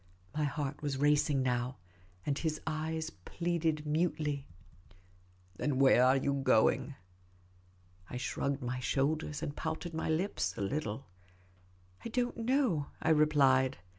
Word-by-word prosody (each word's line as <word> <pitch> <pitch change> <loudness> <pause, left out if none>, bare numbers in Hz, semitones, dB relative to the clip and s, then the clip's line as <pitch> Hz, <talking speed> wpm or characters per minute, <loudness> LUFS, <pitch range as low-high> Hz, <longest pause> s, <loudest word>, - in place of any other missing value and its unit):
My 150 -1 +1
heart 145 0 -3
was 145 -2 -2
racing 145 -1 +3
now, 125 0 -1 0.5
and 140 - 0
his 155 +1 -2
eyes 160 0 -2
pleaded 160 - -2
mutely. 150 -3 0 0.5
" 90 0 -31
Then 145 -3 0
where 130 -2 +6
are 130 +1 +5
you 140 +1 0
going? 135 +3 +3 0.5
" 90 0 -30
I 125 - -5
shrugged 135 +2 -2
my 125 +1 -2
shoulders, 145 +5 -1
and 145 - -3
pouted 160 +2 -4
my 160 - -2
lips 175 +6 -1
a - - -3
little. 120 +2 -2 0.5
" 90 0 -29
I - - -4
don't 245 +1 -1
know," 230 - +1
I - - 0
replied. 140 -4 +4
140 Hz, 140 wpm, -32 LUFS, 120-155 Hz, 0.5 s, where